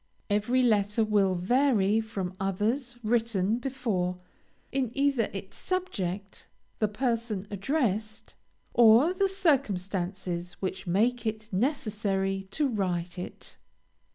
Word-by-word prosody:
Every 240 +5 +2
letter 210 -1 +3
will 205 -3 +2
vary 220 +1 +3
from 195 -5 -4
others 220 +7 -1
written 220 -2 +1
before, 225 -9 -1 0.5
in 265 -3 0
either 275 -5 +2
its 195 0 -7
subject, 205 - -3 0.3
the 215 - +3
person 225 -2 -1
addressed, 215 -1 -1 0.4
or 240 +8 +6
the 390 +1 +1
circumstances 190 - -1
which 190 -1 -5
make 230 +7 +1
it 215 0 -4
necessary 195 -5 -1
to 295 +7 +1
write 180 -6 -2
it. 180 - -8
215 Hz, 105 wpm, -28 LUFS, 195-245 Hz, 0.5 s, or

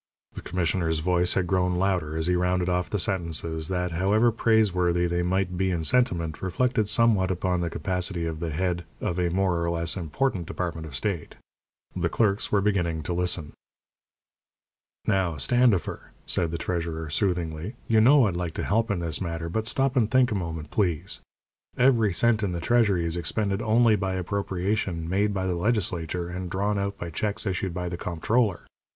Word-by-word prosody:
The - - -7
commissioner's 85 -2 0
voice 90 +2 +1
had 95 - +1
grown 90 -1 +1
louder 90 -4 0
as 80 - 0
he 90 +1 +2
rounded 90 0 +1
off 90 0 0
the 105 - -1
sentences 85 -3 -1
that, 90 -1 -1
however 100 +7 +3
praiseworthy 90 -6 +2
they 85 0 0
might 90 0 -1
be 95 0 +2
in 85 -3 -1
sentiment, 85 -6 +1
reflected 110 +3 0
somewhat 105 -4 +3
upon 90 -1 0
the 85 - -1
capacity 90 +1 -2
of 80 -1 -4
the 85 -1 -3
head 85 +2 -1 0.2
of 90 +1 -2
a 90 -1 +1
more 90 -1 +1
or 85 - 0
less 85 -1 -1
important 90 - -1
department 80 -3 -4
of 70 - -9
state. 95 0 -3 0.6
The - - 0
clerks 105 -3 +1
were 100 - +3
beginning 85 -6 0
to 85 - -2
listen. 90 -3 -1 1.5
"Now, 95 -6 +1
Standifer," 120 - +1 0.2
said 85 - 0
the 85 - -3
treasurer, 85 -2 -3
soothingly, 90 - -1
"you 110 -1 +4
know 135 +2 +6
I'd 95 -4 -1
like 85 -2 -3
to - - -2
help 115 +3 +1
in 100 -4 -1
this 80 0 -1
matter, 85 -2 -3
but 110 +5 -2
stop 135 +2 +1
and 115 -5 +3
think 130 -1 +3
a - - 0
moment, 80 -5 -4
please. 90 -3 -1 0.6
Every 120 -5 +4
cent 110 +5 +2
in 100 -4 -1
the 85 - -3
treasury 100 -3 +2
is 85 0 -2
expended 100 +4 -1
only 115 0 +4
by 95 -2 -2
appropriation 95 -2 -2
made 100 +4 +1
by 95 -2 -2
the 95 - 0
legislature, 90 -3 -1
and 90 +1 -5
drawn 100 +3 0
out 100 0 -2
by 85 -1 -6
checks 105 +6 -2
issued 95 -2 -2
by 90 -1 -3
the 85 0 -4
comptroller. 95 +4 0
90 Hz, 180 wpm, -26 LUFS, 85-105 Hz, 1.5 s, know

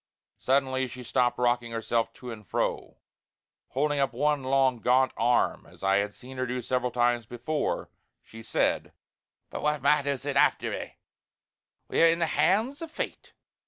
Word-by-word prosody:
Suddenly 130 -1 +1
she 125 +1 -9
stopped 125 0 +1
rocking 120 -1 +1
herself 115 0 0
to 125 -1 -9
and 110 -2 -9
fro; - - -2 0.7
holding 145 +2 0
up 135 -3 +1
one 145 +3 +1
long 130 -1 +2
gaunt 130 +3 +3
arm 120 0 +1
as - - -17
I 95 0 +3
had 100 0 -1
seen 130 +1 -11
her 130 0 -1
do 125 +1 -2
several 125 +1 0
times 120 -1 +1
before, 125 +7 -2 0.3
she 115 - -12
said: - - 0 0.6
"But - - -5
what 150 -2 0
matters 140 -2 +2
it 140 -1 -1
after - - +3
a'! - - -6 0.9
We're 165 - +4
in 165 - +2
the 170 - +1
hands 225 - +1
o' 330 - -4
Fate! 315 - -6
130 Hz, 160 wpm, -28 LUFS, 120-145 Hz, 0.9 s, We're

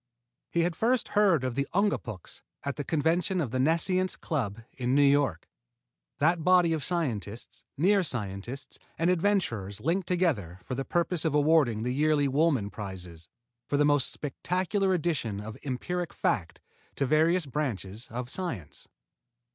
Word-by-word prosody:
He 170 - +1
had 170 0 0
first 240 +5 +1
heard 195 -9 +3
of 130 -1 -1
the 140 +2 -1
Ungapuks 155 - -1 0.2
at 140 -1 -2
the 145 - -3
convention 165 +5 +1
of 140 -9 -1
the 130 - -1
Nescience 180 +6 +2
Club 115 - -3
in 125 0 0
New 145 - +5
York, 140 - +2 0.7
that 165 +2 +2
body 180 -2 +5
of 155 -3 -2
scientists, 120 - -2
near 195 +6 +4
scientists 120 - -4 0.2
and 170 +2 +3
adventurers 160 - 0
linked 175 +4 0
together 135 - 0
for - - -5
the 135 +2 -2
purpose 170 +2 0
of 160 -3 +1
awarding 145 -7 +3
the 125 - -1
yearly 150 0 +2
Woolman 135 -7 +2
prizes 90 -5 -8 0.4
for 145 - +1
the 145 - +4
most 145 -2 +2
spectacular 185 +6 -1
addition 145 - -1
of 105 +1 -7
empiric 170 +6 -3
facts 90 +1 -1 0.4
to 140 - 0
various 160 +5 +3
branches 120 -6 -3
of 120 +2 -4
science. 120 - -5
145 Hz, 150 wpm, -28 LUFS, 115-175 Hz, 0.7 s, New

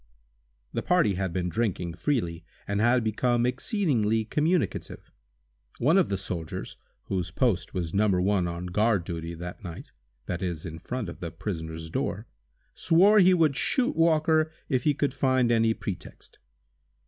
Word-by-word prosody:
The - - -1
party 100 - +3
had 95 -1 -2
been 90 0 -1
drinking 90 -4 -1
freely, 85 - -1 0.2
and 100 0 0
had 120 +1 +3
become 120 +2 +1
exceedingly 125 - 0
communicative. 155 +6 -1 0.7
One 145 +8 +3
of 185 - +2
the 100 - 0
soldiers, 90 -4 -5 0.3
whose 90 -2 -2
post 95 -2 0
was 85 -3 -3
No. 105 +2 +3
1 95 -1 +2
on 85 +1 -5
guard 105 +1 +1
duty 85 0 -5
that 90 +4 -8
night—that - - -8
is, 85 -3 -3
in 80 -1 -7
front 120 +4 -4
of 85 - -8
the 85 - -4
prisoner's 80 -3 -6
door—swore 165 - +1
he 185 -1 +6
would 155 -5 +3
shoot 250 - 0
Walker 160 -1 +3 0.2
if 130 -4 0
he 150 -2 +3
could 140 -1 0
find 130 -3 +2
any 115 -1 +3
pretext. 100 - -8
105 Hz, 150 wpm, -27 LUFS, 85-130 Hz, 0.7 s, he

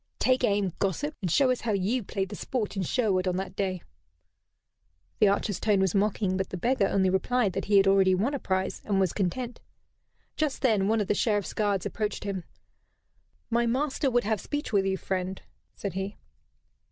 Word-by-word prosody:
Take 255 0 +2
aim, 200 -5 +1
gossip, 240 - -1
and 185 - -1
show 260 - +4
us 250 - -1
how 225 -2 -1
you 200 +6 0
played 195 -2 -3
the 205 - -6
sport 220 -4 -3
in 195 - -1
Sherwood 190 -1 +1
on 180 - +1
that 190 0 -4
day." 190 -3 -2 1.4
The 210 - +6
archer's 200 -1 0
tone 210 -3 +2
was 190 -3 +2
mocking; 200 -1 +1
but 190 -1 -2
the 185 - -5
beggar 235 +1 +2
only 190 -2 +2
replied 205 +1 +1
that 195 - -3
he 205 -1 +4
had 195 - +6
already 195 -1 +5
won 225 +10 0
a 280 - -2
prize 190 -3 -2
and 200 -2 0
was 190 -3 +1
content. 235 +6 -2 0.7
Just 300 -3 -1
then 215 -6 +3
one 220 0 +2
of 205 - -2
the - - +2
Sheriff's 205 -2 0
guards 205 -3 0
approached 210 -2 -3
him. 195 -4 -4 1.1
"My 235 +1 +2
master 275 +3 0
would 245 -1 +2
have 215 -2 -1
speech 290 -5 -4
with 195 -1 +3
you, 190 0 0
friend," 185 0 -3 0.4
said 200 -3 -4
he. 195 +2 -4
200 Hz, 195 wpm, -28 LUFS, 190-230 Hz, 1.4 s, The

